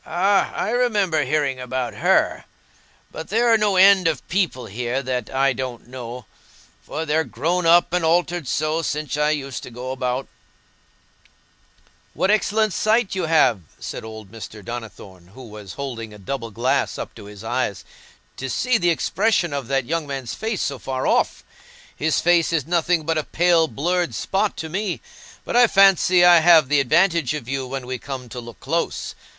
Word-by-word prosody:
"Ah, 195 +4 +1
I - - -1
remember 205 - +1
hearing 140 -1 0
about 125 0 -3
her. - - +1 0.7
But 160 - -8
there 230 +3 +3
are - - +6
no 205 -2 +2
end 190 -1 +6
of 160 - -2
people 175 -8 -1
here 125 +5 -3
that 125 -3 -3
I 135 0 +2
don't 125 -1 -6
know, 125 -2 -8 0.6
for 160 +2 -5
they're 160 +1 +1
grown 165 +7 -1
up 170 +1 +5
and 180 -1 +1
altered 170 -1 +1
so 155 +4 0
since 150 -1 -3
I 150 0 +1
used 140 -4 -3
to - - -9
go 125 +2 -6
about." 130 0 -2 1.9
"What 190 - +2
excellent 215 -1 +1
sight 220 +3 +1
you 185 -3 -1
have!" 150 - +3 0.2
said - - -6
old 110 -3 -10
Mr. 110 -2 -10
Donnithorne, 100 -6 -9
who 130 - -10
was 105 -3 -10
holding 115 -6 -6
a - - -12
double 115 +4 -5
glass 125 +5 0
up - - -6
to 105 - -12
his 105 0 -11
eyes, 120 -3 -2 0.5
"to 135 - -5
see 250 - +1
the 175 -2 +2
expression 175 0 +1
of 140 -1 -4
that 135 -2 0
young 165 +3 -2
man's 135 -4 -5
face 220 -3 -3
so 140 -2 -3
far 130 0 -3
off. - - +1 0.5
His 155 -1 0
face 170 -1 +3
is 160 -5 0
nothing 170 0 +1
but 160 0 0
a - - -2
pale 170 0 +2
blurred 170 -3 -1
spot 200 - -1
to 160 - -4
me. 190 +2 -3 0.5
But - - -3
I 245 0 +7
fancy 190 -3 +5
I 175 -1 +8
have 160 -4 +6
the 145 -1 +3
advantage 160 +1 +2
of 135 -6 -7
you 135 -1 -3
when 130 0 -5
we 130 0 -4
come 130 -3 -7
to 125 - -7
look 120 -1 -11
close. 160 +8 -2
150 Hz, 180 wpm, -22 LUFS, 125-175 Hz, 1.9 s, I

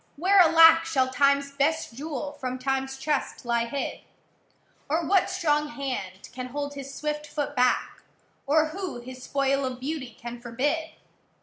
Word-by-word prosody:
where, 380 +6 +4
alack, 330 -1 +8
Shall 275 -6 +1
Timeâs 280 +1 +2
best 315 -2 +1
jewel 285 +1 -5
from 260 -3 -5
Timeâs 270 +1 -2
chest 290 -2 -2
lie 235 -1 +1
hid? 275 +4 -4 0.9
Or 320 +3 +1
what 380 +3 +3
strong 300 -5 +1
hand 260 -10 -5
can 255 0 -5
hold 285 +2 -4
his 275 -1 -7
swift 300 +1 -4
foot 290 -1 -3
back? 250 0 +1 0.5
Or 310 +2 +3
who 365 -5 -5
his 255 +1 -10
spoil 275 +1 0
of 255 -1 -3
beauty 260 -4 -5
can 240 0 -7
forbid? 290 +7 -2
280 Hz, 150 wpm, -26 LUFS, 255-310 Hz, 0.9 s, alack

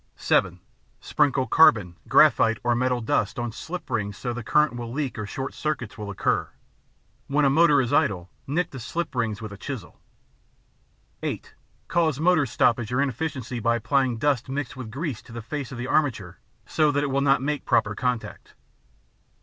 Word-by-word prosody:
(7) - - +1 0.4
Sprinkle 140 -3 +1
carbon, 105 - +4
graphite 115 0 +5
or 120 0 +2
metal 125 0 0
dust 110 -2 0
on 120 -1 -2
slip 175 +10 -7
rings 105 -2 -2
so 125 - -4
that - - -1
the 120 -1 -6
current 150 +3 +2
will 120 -1 -6
leak 130 -3 -3
or 105 - -4
short 135 +5 -5
circuits 145 -9 -3
will 105 -1 -6
occur. 100 - 0 0.8
When 145 +1 +2
a 135 - +4
motor 155 -1 +5
is 125 -3 0
idle, 90 -3 +1 0.2
nick 165 +6 -1
the 135 - -7
slip 165 +9 -4
rings 115 -4 -2
with 105 -2 -6
a - - -9
chisel. 125 -10 -7 1.2
(8) - - -5 0.3
Cause 160 -4 +1
motor 160 -3 +3
stoppage 120 -2 +1
or 125 - 0
inefficiency 135 -2 -2
by 115 +1 +2
applying 130 +1 +1
dust 130 0 0
mixed 135 -1 -4
with 130 -4 -7
grease 135 0 -4
to - - -16
the 115 - -6
face 140 +2 -5
of 130 - -7
the 120 - -4
armature 125 - 0 0.3
so 155 -2 +2
that 145 0 0
it 140 - -1
will 135 +1 +1
not 135 -2 +3
make 150 0 -2
proper 105 - +2
contact. 125 +1 -4
125 Hz, 180 wpm, -25 LUFS, 115-145 Hz, 1.2 s, graphite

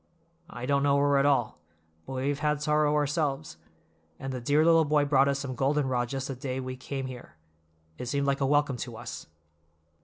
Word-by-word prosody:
I 120 -6 -6
don't 140 +1 +2
know 140 0 +3
her 140 0 +3
at 140 - +3
all, 135 -6 +1 0.5
but - - -6
we 130 +2 -1
have 145 0 -2
had 150 -1 0
sorrow 150 0 +2
ourselves; 145 - -1 0.6
and 135 0 -5
the 125 - -4
dear 145 +6 +3
little 165 -1 +6
boy 150 -1 +2
brought 140 -1 +4
us 140 -1 +1
some 140 -2 -4
golden 135 +3 +1
rod 120 -2 -1
just 135 -1 -3
the 135 - -3
day 130 0 -4
we 130 0 -5
came 135 +1 -5
here—it 80 - -12
seemed 140 +2 0
like 140 0 0
a 135 - +2
welcome 145 -2 +2
to 120 -1 -6
us." 120 -7 -8
135 Hz, 205 wpm, -28 LUFS, 125-145 Hz, 0.6 s, little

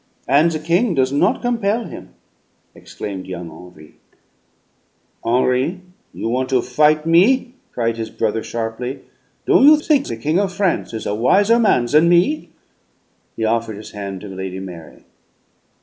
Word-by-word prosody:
"And 145 +6 +4
the 160 - -2
king 170 +6 0
does 130 0 +1
not 205 - +1
compel 230 -2 0
him!" - - -11 0.6
exclaimed 95 -3 -8
young 90 -3 -7
Henri. 80 -2 -15 1.3
"Henri, 130 +8 +1 0.3
you - - -5
want 130 +2 -1
to 130 -3 +1
fight 150 +4 +2
me?" 240 +10 +3 0.2
cried 115 -1 -2
his 110 -1 -4
brother 110 0 -2
sharply. 115 +4 -5 0.4
"Don' - - +4
you 305 +1 +8
think 300 -2 +1
the - - -5
King 155 +9 0
of 200 -2 0
France 190 -1 -1
is 110 -1 -6
a 105 - -1
wiser 200 - +3
man 205 - +3
than 150 +7 +3
me?" 180 - +2 0.9
He 110 - -2
offered 115 -1 -1
his 105 - -10
hand 100 -2 -6
to 105 - -9
Lady 95 -1 -6
Mary. 90 -4 -10
130 Hz, 150 wpm, -19 LUFS, 110-185 Hz, 1.3 s, you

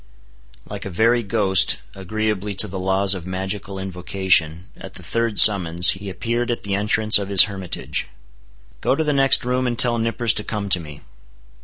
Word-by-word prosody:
Like 100 -1 -8
a - - -5
very 115 +6 +1
ghost, 100 -3 +1 0.2
agreeably 105 +1 -4
to 105 - +3
the 95 -1 -7
laws 95 +1 +1
of 90 -2 -8
magical 95 +1 -6
invocation, 90 -3 -1
at - - -12
the 90 - -11
third 115 +4 -2
summons, 90 -4 +5
he 100 +1 -7
appeared 120 +5 -3
at 120 - -3
the 100 - -4
entrance 105 +2 +1
of 100 -1 -6
his 100 -2 +8
hermitage. 95 -5 -5 0.7
"Go - - +1
to 160 - -1
the 150 -1 -1
next 135 -2 +3
room, 125 +1 -1
and 120 -1 -3
tell 120 -1 +2
Nippers 115 0 -1
to 105 - -3
come 105 -2 -5
to 95 - +3
me." 75 -3 -11
100 Hz, 180 wpm, -20 LUFS, 95-115 Hz, 0.7 s, his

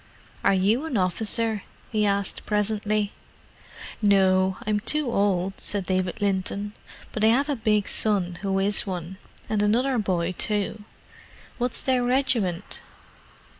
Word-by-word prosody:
"Are 195 - +4
you 210 +10 +2
an 260 - -1
officer?" 215 +3 +1 0.3
he 215 -1 +2
asked 200 -1 -2
presently. 210 0 0 0.9
"No, 190 -2 +3
I'm 210 0 +1
too 295 +4 +2
old," 195 -2 0
said 200 -2 -1
David 185 +1 -1
Linton. 200 +1 -1 0.4
"But 215 - -2
I - - +6
have 270 +6 +3
a 290 - +1
big 215 -3 +1
son 185 -5 0
who 195 -1 0
is 200 +1 +2
one—and 190 +4 -5
another 240 +5 +2
boy 180 -4 0
too." 210 +2 -1 0.7
"What's 245 -1 -2
their 255 -2 +2
regiment?" 245 -8 0
205 Hz, 130 wpm, -25 LUFS, 190-220 Hz, 0.9 s, I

